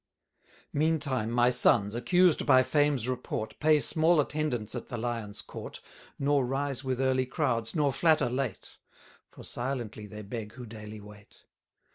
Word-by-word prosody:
Meantime 145 -7 0
my 120 +1 +3
sons, 105 -4 +3
accused 175 +8 +3
by 130 -2 +6
fame's 145 -3 +1
report, 125 -3 -4
Pay 155 0 +4
small 160 +3 +3
attendance 140 -7 -1
at 120 - -6
the 120 - -5
Lion's 115 -3 -4
court, - - -8 0.4
Nor 140 0 +2
rise 135 +1 -2
with 130 -1 -2
early 130 -1 +1
crowds, 120 -5 -1
nor 145 -4 +2
flatter 160 -2 +3
late; 125 -3 -4 0.5
For - - -13
silently 120 -4 -5
they 105 +1 -9
beg 105 +1 -6
who 125 -1 -9
daily 110 -1 -9
wait. 105 0 -16
130 Hz, 145 wpm, -29 LUFS, 115-145 Hz, 0.5 s, by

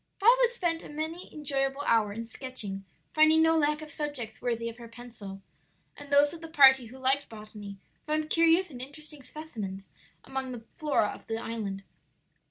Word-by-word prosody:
Violet 485 +4 +5
spent 345 -10 -2
many 320 +3 -4
an - - -20
enjoyable 275 -2 -1
hour 220 -3 +3
in 230 +3 -6
sketching, 220 -5 -4 0.3
finding 315 +1 +5
no 325 0 +4
lack 300 0 +1
of 305 - -8
subjects 275 -8 -5
worthy 235 -2 -2
of 230 0 -7
her 235 - -9
pencil; 225 -5 -11 0.5
and 285 0 -12
those 290 +1 +5
of 335 - -10
the 325 - -7
party 265 -6 +6
who 255 +4 -12
liked 265 +2 +5
botany 210 -2 -10 0.3
found 310 0 -1
curious 330 +2 +3
and 250 -2 -8
interesting 295 +2 -10
specimens 215 - -8 0.3
among 265 -1 -4
the 230 -2 -8
flora 295 -9 +1
of - - -14
the 225 - -2
island. 215 -4 -5
270 Hz, 175 wpm, -28 LUFS, 225-310 Hz, 0.5 s, party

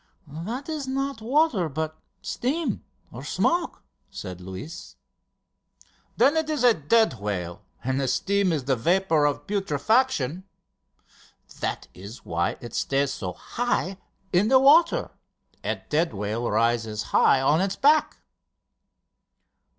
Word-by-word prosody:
"That 180 - -6
is 305 -4 -4
not 270 -2 -2
water, 245 - +2
but 155 +2 -3 0.3
steam 300 +7 -2 0.3
or - - -9
smoke," 345 0 0 0.3
said 90 -1 -8
Luis. 110 - -8 1.2
"Then 285 +4 +4
it 320 -1 0
is 300 -5 -1
a 245 -2 +7
dead 185 - +2
whale, 90 -4 -4 0.2
and 130 +2 0
the 135 - 0
steam 200 +6 +1
is 150 -5 -1
the 135 0 +1
vapour 165 +3 +2
of 145 - -3
putrefaction. 195 - +1 1.2
That - - -3
is 100 +6 -11
why 85 +1 -1
it 120 - -9
stays 140 0 0
so 90 -2 -5
high 195 - -2 0.3
in 185 +4 +4
the 265 - +6
water 290 +6 +5 0.5
a - - -1
dead 155 -4 -1
whale 105 +4 -2
rises 115 -1 0
high 135 - +5
on 150 +5 +3
its 195 0 -1
back!" 300 +2 +3
165 Hz, 125 wpm, -25 LUFS, -, 1.2 s, a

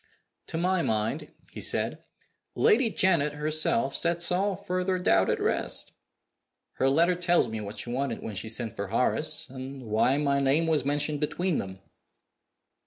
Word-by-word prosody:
"To - - -3
my 180 +1 +1
mind," 110 +6 -1 0.2
he - - -8
said, - - -1 0.5
"Lady 430 - +4
Janet 170 -8 +2
herself 150 -3 +1
sets 170 +2 +1
all 195 +2 +1
further 185 +1 -1
doubt 135 - +3
at - - 0
rest. - - -1 0.9
Her 135 - +3
letter 170 +6 +3
tells 175 -5 +2
me 110 -1 -5
what 100 0 -7
she 120 - -5
wanted 135 +3 -2
when 110 - -5
she 105 +3 -5
sent 115 -1 -2
for 100 - -4
Horace, 150 +8 0
and 130 0 -8
why 115 +4 +2
my 140 -1 +1
name 140 +4 +2
was 160 -4 +1
mentioned 145 +1 0
between 175 +3 -1
them." 95 0 -7
150 Hz, 160 wpm, -27 LUFS, 125-170 Hz, 0.9 s, Lady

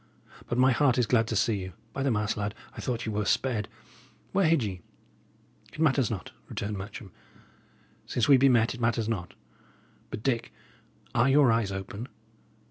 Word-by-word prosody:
But 120 - -2
my 130 +1 +5
heart 130 0 +3
is 125 - +3
glad 115 0 +2
to 110 - -2
see 110 +1 +2
you. 95 -1 -6 0.2
By 140 - -3
the 135 - +1
mass, 105 -2 0
lad, 105 0 -3 0.2
I - - -6
thought 120 -2 -2
ye 110 - -2
were 105 0 -1
sped! 115 -1 0 0.6
Where 195 -3 +3
hid 160 -5 +3
ye?" 95 -4 -4 0.9
"It - - -11
matters 140 -7 +3
not," 95 -7 -5 0.2
returned 105 +1 -3
Matcham. 100 0 -8 1.0
"Since 120 - 0
we 140 -2 +8
be 135 +1 +5
met, 115 -2 +3
it 120 - -9
matters 115 -1 +1
not. 100 -6 -3 0.7
But, 105 - -6
Dick, 120 -4 0 0.6
are 120 +3 +3
your 135 -2 +5
eyes 115 -3 +1
open? 95 +4 -6
115 Hz, 180 wpm, -28 LUFS, 105-130 Hz, 1.0 s, we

